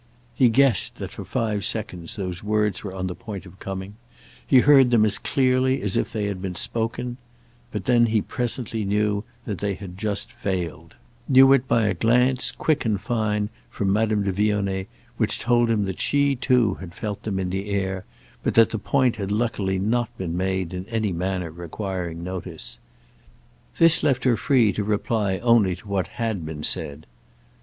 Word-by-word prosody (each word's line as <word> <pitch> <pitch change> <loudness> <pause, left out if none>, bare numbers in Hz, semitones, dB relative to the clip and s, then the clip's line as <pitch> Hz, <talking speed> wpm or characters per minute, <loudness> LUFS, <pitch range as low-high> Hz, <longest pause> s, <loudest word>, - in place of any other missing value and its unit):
He 125 -3 +4
guessed 130 -3 +3
that - - -6
for - - -8
five 105 -3 -2
seconds 95 -7 -3
these 90 -3 -5
words 105 -2 0
were 100 - -5
on 95 -1 -3
the 90 - -3
point 105 -2 -8
of 95 +1 -14
coming; 95 +2 -6 0.5
he 130 -2 +6
heard 135 -3 +6
them 115 -3 +4
as 105 -1 0
clearly 130 0 +2
as 100 -2 0
if - - 0
they 110 -3 -2
had 100 -2 -3
been 95 -2 -4
spoken; 120 +5 -2 0.5
but 105 -3 -5
he 120 -3 +4
presently 120 -1 -2
knew 105 +1 0 0.2
they 100 -1 -2
had 95 -2 -10
just 105 -1 -2
failed—knew 110 - +1
it 135 -1 +2
by 115 - +3
a 100 - +2
glance, 125 +6 +2
quick 155 -2 0
and 110 -4 0
fine, 105 -2 -1 0.2
from 100 -1 -1
Madame 110 -1 +1
de 100 - 0
Vionnet, 100 -1 0 0.3
which 110 -2 +1
told 120 0 +2
him 105 -3 +1
that 95 -1 -4
she 140 -1 +2
too 125 -4 +2
had 90 -2 -9
felt 105 -2 -4
them 100 -3 -3
in 95 -1 -2
the 95 +2 -3
air, 95 -2 -1 0.4
but - - -1
that 115 -1 +6
the 110 - -2
point 130 +2 +1
had 100 -1 -3
luckily 105 -3 0
not 115 +4 0
been 85 -3 -3
made 95 -1 -1
in 90 +1 -5
any 110 -4 -1
manner 90 -1 -2
requiring 85 0 -5
notice. 90 0 -6 1.0
This 165 -1 +6
left 135 -2 +1
her 125 -3 +4
free 115 -4 +3
to 105 - -2
reply 105 -1 0
only 115 -6 +3
to 95 - -16
what 95 -3 -1
had 110 -7 -2
been 80 -1 -6
said. 75 +1 -1
105 Hz, 180 wpm, -24 LUFS, 95-120 Hz, 1.0 s, he